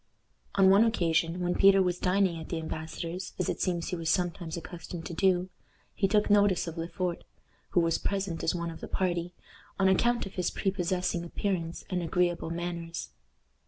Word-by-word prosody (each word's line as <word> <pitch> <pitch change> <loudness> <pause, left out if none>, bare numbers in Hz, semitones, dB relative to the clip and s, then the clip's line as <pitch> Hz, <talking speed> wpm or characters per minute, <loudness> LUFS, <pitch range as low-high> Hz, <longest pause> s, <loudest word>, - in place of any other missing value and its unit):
On 190 -1 +6
one 200 +3 +7
occasion, 170 -5 +1
when 175 0 +1
Peter 195 +1 +6
was 180 -2 +1
dining 185 -2 +2
at 160 - -9
the 170 - -2
embassador's 165 +3 -5
as 180 - -1
it - - -2
seems 175 -3 0
he - - -1
was 165 -2 -2
sometimes 175 -2 -1
accustomed 170 0 -7
to - - -5
do 185 +1 +2 0.4
he 195 - +1
took 210 +1 +2
notice 205 -3 +4
of 165 -2 -6
Le 165 0 -3
Fort, 180 -1 -3 0.5
who - - +5
was 165 -1 +1
present 195 -4 -2
as 165 - +1
one 170 -1 -3
of 165 - -11
the - - -5
party, 175 -1 -1 0.4
on 195 - +3
account 235 +6 +3
of 195 - -8
his 180 -2 0
prepossessing 180 -2 -1
appearance 170 -1 -3
and 180 -1 -1
agreeable 175 0 0
manners. 170 - -4
175 Hz, 185 wpm, -29 LUFS, 165-190 Hz, 0.5 s, one